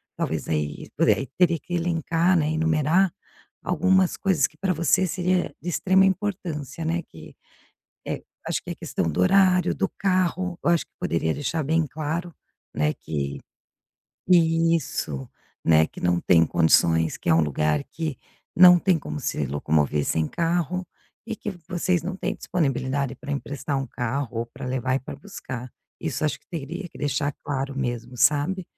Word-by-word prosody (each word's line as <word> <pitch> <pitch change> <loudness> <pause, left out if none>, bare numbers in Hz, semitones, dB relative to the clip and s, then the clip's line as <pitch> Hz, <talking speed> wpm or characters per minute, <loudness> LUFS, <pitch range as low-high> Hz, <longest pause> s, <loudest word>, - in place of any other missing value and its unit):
talvez - - -2
aí 75 -2 -2
pois - - +3
é, - - +8
aí 135 - -4
teria 175 -2 +4
que 175 - -9
elencar, 170 +1 +1
né, 150 -1 +1
enumerar 160 +3 +2 0.5
algumas 190 +1 +2
coisas 185 -8 +2
que - - -27
pra 190 +2 0
você 170 +3 +2
seria 180 +1 0
de - - -9
extrema 190 +2 +3
importância, 175 -6 -2
né, 170 +2 0
que 80 -1 -12 0.7
é, - - -3 0.3
acho - - -1
que - - -9
é - - -2
a - - -14
questão 80 - -2
do 80 - -3
horário, 180 - +4
do - - 0
carro, 185 -2 0
eu - - +2
acho 170 -1 +2
que - - -52
poderia 80 -1 0
deixar 155 +2 -2
bem 160 +3 +2
claro, 160 +4 -3 0.4
né, 75 0 +1
que 70 -2 -4 0.9
Isso, 165 - +2 0.4
né, 80 -1 +5
que - - -12
não 90 0 +2
tem 80 -1 +5
condições, 80 -1 +3
que - - -2
é 80 - +6
um 85 - +5
lugar 75 0 +1
que 160 -5 -5 0.4
não 180 0 +9
tem 175 -1 +2
como 150 - -6
se 75 - -1
locomover 75 +1 +1
sem 80 -1 0
carro, 175 +1 -1 0.4
e 225 - -2
que 210 - -5 0.2
vocês 180 -1 0
não 185 +2 -3
têm 195 +1 -3
disponibilidade 135 -4 -1
pra 140 - -6
emprestar 140 0 -3
um 135 - -2
carro, 125 +3 -2
ou 115 - -3
pra 125 +3 -10
levar 130 0 -1
e 135 - 0
pra 130 - -8
buscar. 130 - -7 0.3
Isso - - -2
acho 150 - 0
que - - -38
teria 170 +3 -5
que - - -16
deixar 145 0 -1
claro 135 -1 -3
mesmo, 120 -2 -3
sabe? 150 +9 +2
155 Hz, 175 wpm, -25 LUFS, 120-175 Hz, 0.9 s, não